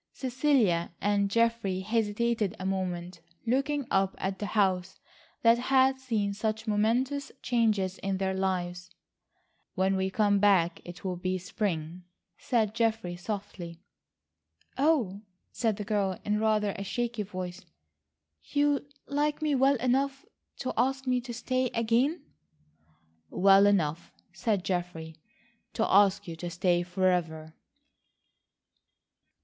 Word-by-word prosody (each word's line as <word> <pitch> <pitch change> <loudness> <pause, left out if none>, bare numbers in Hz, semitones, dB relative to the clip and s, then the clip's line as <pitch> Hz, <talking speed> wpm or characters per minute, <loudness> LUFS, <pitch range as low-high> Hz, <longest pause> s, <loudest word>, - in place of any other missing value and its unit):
Cecilia 250 - +1
and 200 0 +1
Geoffrey 230 -4 +1
hesitated 220 0 0
a 185 - -5
moment 180 -2 -3 0.2
looking 275 +4 0
up 195 0 +2
at 190 0 -3
the 205 - -3
house 190 -3 0 0.4
that 230 0 +5
had 265 +1 +3
seen 220 -6 -1
such 220 +1 -2
momentous 245 +7 0
changes 215 -6 +1
in 195 -1 -2
their 190 0 -1
lives. 180 -1 -2 0.9
"When 190 0 +2
we 190 0 0
come 205 0 +2
back, 185 -4 +3
it 175 0 -10
will 180 -1 -2
be 185 +1 -1
spring," 180 -3 -3 0.4
said 220 -4 0
Geoffrey 225 -6 0
softly. 180 -3 -6 1.0
"Oh," 260 - +1 0.3
said 225 -4 0
the 210 - -4
girl 195 -3 0
in 210 0 +1
rather 215 -2 +2
a - - -3
shaky 235 +2 -2
voice, 185 -2 -6 0.8
"you 285 -1 0 0.2
like 295 +1 0
me 305 -2 0
well 270 +1 +4
enough 270 +5 0 0.4
to 255 - -2
ask 265 +3 0
me 250 -1 +1
to 240 0 -8
stay 255 +2 -1
again?" 240 +8 +1 1.1
"Well 195 - +5
enough," 170 -5 0 0.2
said 190 +2 -1
Geoffrey, 175 -3 -3 0.6
"to 225 - +1
ask 200 0 +4
you 165 - -5
to 175 +1 -5
stay 175 0 +1
forever." 175 -3 -1
205 Hz, 125 wpm, -29 LUFS, 185-240 Hz, 1.1 s, that